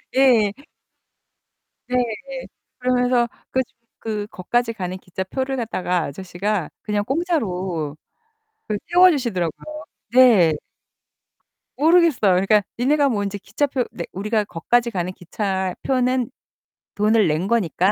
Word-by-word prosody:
예. 245 -6 +5 1.4
네. 250 - -2 0.8
그러면서 250 -1 +2 0.2
그 260 - +2 0.4
그 210 -2 -3
거까지 235 +6 0
가는 185 -5 -4
기차표를 190 +9 -4
갖다가 180 -7 -1
아저씨가 185 +3 -3
그냥 210 -1 -1
공짜로 190 - -2 0.7
그 210 -1 -2
태워주시더라고요. 305 - +2 0.3
네. 230 -11 +7 1.3
모르겠어요. 315 - +4
그러니까 195 +4 +4 0.2
'니네가 280 +3 +3
뭐 210 -5 0
이제 200 0 -3
기차표 255 +6 -1
내' 170 - -6
우리가 210 +3 0
거까지 235 +7 0
가는 180 -2 -2
기차표는 210 +8 -1 0.7
돈을 215 +1 +3
낸 160 +4 0
거니까 195 -4 +2
215 Hz, 255 characters per minute, -22 LUFS, 185-255 Hz, 1.4 s, 네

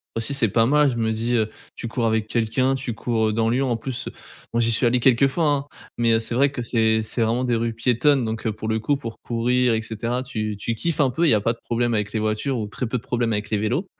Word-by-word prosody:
Aussi, 115 +4 0
c'est 125 -6 +2
pas 115 +3 +3
mal, 150 +3 +4
je 125 - -3
me 110 -1 0
dis: 115 +2 -1
«heu, 110 -2 +2 0.3
tu - - -5
cours 115 0 -1
avec 110 -1 +1
quelqu'un, 115 +4 0
tu 130 -3 -3
cours, 115 -1 0
heu, - - -1
dans 115 +1 +1
Lyon.» 130 +2 +1
en 115 - 0
plus, 125 +1 -5 0.4
moi, 115 - 0
j'y 115 0 +3
suis 115 - +2
allé 125 +1 +2
quelques 130 +1 +4
fois, 160 +5 -1
hein 145 -1 +1 0.3
mais 115 -1 +3
heu, 115 - +3
c'est 115 +1 -3
vrai 135 +3 +3
que 125 -3 -4
c'est 110 -1 +2
c'est 110 +2 -3
vraiment 115 +3 +1
des 125 -1 0
rues 115 0 -1
piétonnes 125 +3 +2
donc 110 0 -3
heu, - - +1
pour 110 +1 -6
le 110 0 0
coup, 140 +6 0
pour 115 -5 -7
courir 120 +1 +1
et 110 - -1
cetera, 115 +3 -3
tu 110 -5 -4
tu 115 +4 -2
kiffes 155 +7 -1
un 135 -3 +3
peu. 165 +6 +1
Il - - +5
y 115 - +5
a 105 - +1
pas 115 +3 +1
de 115 - -17
problème 120 0 0
avec 105 -2 -1
les 110 - 0
voitures 110 +5 -1
ou 110 - -2
très 120 +4 -4
peu 120 - -1
de 120 - -8
problème 120 -2 -1
avec 105 -1 -3
les 105 - +2
vélos 120 - -1
115 Hz, 290 wpm, -23 LUFS, 110-125 Hz, 0.4 s, Il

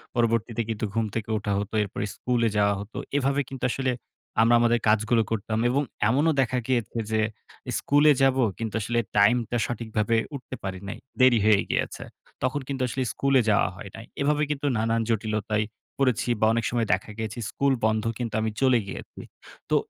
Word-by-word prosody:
পরবর্তীতে 115 -1 +1
কিন্তু 110 0 -2
ঘুম 115 0 +1
থেকে 115 -1 -3
ওঠা 105 - -3
হতো 105 +1 -5
এরপর 100 - -7 0.2
স্কুলে 120 -2 +1
যাওয়া 100 0 +3
হতো। 100 +3 -8 0.2
এভাবে 140 +1 +1
কিন্তু 135 -2 -8
আসলে 130 0 0 0.5
আমরা 115 +1 +5
আমাদের 120 0 +3
কাজগুলো 110 +2 +3
করতাম 110 0 -1
এবং 135 +3 +2 0.3
এমনও 145 +7 +3
দেখা 130 0 0
গিয়েছে 120 -3 -1
যে 110 - +2 0.6
স্কুলে 145 +1 +4
যাবো 135 -1 +4
কিন্তু 115 -2 -4
আসলে 120 +3 0 0.2
টাইমটা 115 +3 +3
সঠিকভাবে 115 -1 -1 0.2
উঠতে 130 -1 -7
পারি 95 -1 -4
নাই, 100 - -5 0.2
দেরি 130 -2 +6
হয়ে 105 -2 +5
গিয়েছে। - - -2 0.4
তখন 130 +3 0
কিন্তু 135 -2 -3
আসলে 130 +2 -3
স্কুলে 135 -1 +3
যাওয়া 105 -1 +3
হয় 100 - -9
নাই। 115 - -9 0.2
এভাবে 150 +1 +2
কিন্তু 145 -1 -2
নানান 115 +1 +1
জটিলতায় 110 -1 0 0.3
পড়েছি 130 -3 +1
বা 110 - +3
অনেক 115 -1 0
সময় 120 -2 0
দেখা - - -2
গেছে 110 +1 -4
স্কুল 140 -1 +1
বন্ধ, 110 0 +1
কিন্তু 120 -2 -4
আমি 110 0 -1
চলে 130 -3 +4
গিয়েছি। - - -8 0.5
তো - - +3
115 Hz, 175 wpm, -26 LUFS, 110-130 Hz, 0.6 s, দেরি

